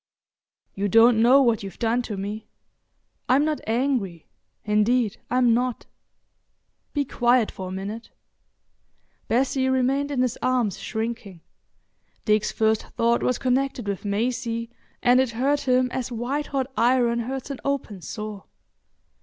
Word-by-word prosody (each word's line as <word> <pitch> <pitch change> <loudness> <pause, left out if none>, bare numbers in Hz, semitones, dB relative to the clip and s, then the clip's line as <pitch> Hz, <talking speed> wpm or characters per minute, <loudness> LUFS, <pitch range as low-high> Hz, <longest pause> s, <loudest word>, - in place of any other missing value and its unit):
"You 200 +1 -1
don't 225 +2 +5
know 260 +4 +6
what 235 -3 +2
you've 195 -1 -8
done 235 +1 +1
to 205 - -4
me. 205 +3 -5 0.8
I'm 270 +4 +4
not 310 -1 -1
angry—indeed, 220 - -1
I'm 250 -2 +3
not. 245 0 -1 1.1
Be 285 -1 -1
quiet 240 -2 +2
for 185 - -7
a - - -6
minute." 200 +5 -6 1.2
Bessie 260 +2 +1
remained 265 +2 +1
in 265 -3 0
his 250 -2 -2
arms 250 -6 0
shrinking. 220 -5 -5 0.8
Dick's 215 -1 +2
first 220 -1 +1
thought 235 +1 +2
was 250 - +1
connected 255 -3 -1
with 200 -2 -3
Maisie, 230 +2 -2 0.3
and 250 +1 +5
it 260 -1 +2
hurt 280 +2 0
him 255 0 +3
as 255 -1 -3
white 255 +6 -2
hot 270 -2 -1
iron 240 -1 +2
hurts 265 +3 -4
an 275 - -6
open 265 -9 -3
sore. 210 +1 -7
240 Hz, 135 wpm, -24 LUFS, 215-255 Hz, 1.2 s, know